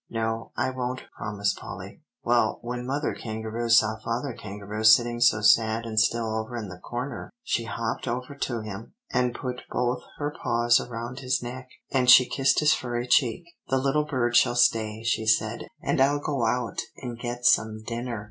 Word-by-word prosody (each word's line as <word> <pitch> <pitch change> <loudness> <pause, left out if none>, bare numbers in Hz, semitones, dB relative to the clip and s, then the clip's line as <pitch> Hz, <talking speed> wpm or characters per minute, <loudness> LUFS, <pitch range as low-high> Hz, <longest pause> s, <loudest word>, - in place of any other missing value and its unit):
"No, 115 0 -3
I 130 - 0
won't," 130 0 -4
promised 100 -1 -2
Polly. - - -9 0.2
"Well, - - +2
when 125 +1 -4
Mother 145 +3 -1
Kangaroo 110 +1 -4
saw 110 -1 +4
Father 120 +4 -3
Kangaroo 105 -1 -7
sitting 120 +2 +5
so 105 -3 +4
sad 110 +2 +4
and 110 -1 0
still 115 -1 +1
over 110 +2 -5
in 105 -4 -5
the 90 0 -10
corner, 120 +3 -5
she 115 - -1
hopped 115 +2 -3
over 125 +3 -3
to 120 -4 -3
him, 110 - -8 0.2
and 125 -1 +1
put 125 -1 -5
both 125 0 -1 0.2
her 145 0 -3
paws 120 0 +3
around 120 +2 -6
his 130 -2 -1
neck, 125 +1 -7 0.2
and 130 -2 +2
she 125 0 +9
kissed 135 +1 +2
his 150 0 +5
furry 120 -1 -3
cheek, 125 +3 +2 0.3
'The 135 - +2
little 140 +3 +1
bird 125 -5 0
shall 120 - +5
stay,' 110 -3 +2
she 110 -1 0
said, 110 +1 +1 0.2
'and - - +1
I'll 140 +2 +4
go 140 -5 -1
out 120 +1 -1 0.2
and 120 -3 -7
get 120 0 -5
some 110 -3 +3
dinner. 120 0 -4
120 Hz, 180 wpm, -26 LUFS, 110-125 Hz, 0.3 s, she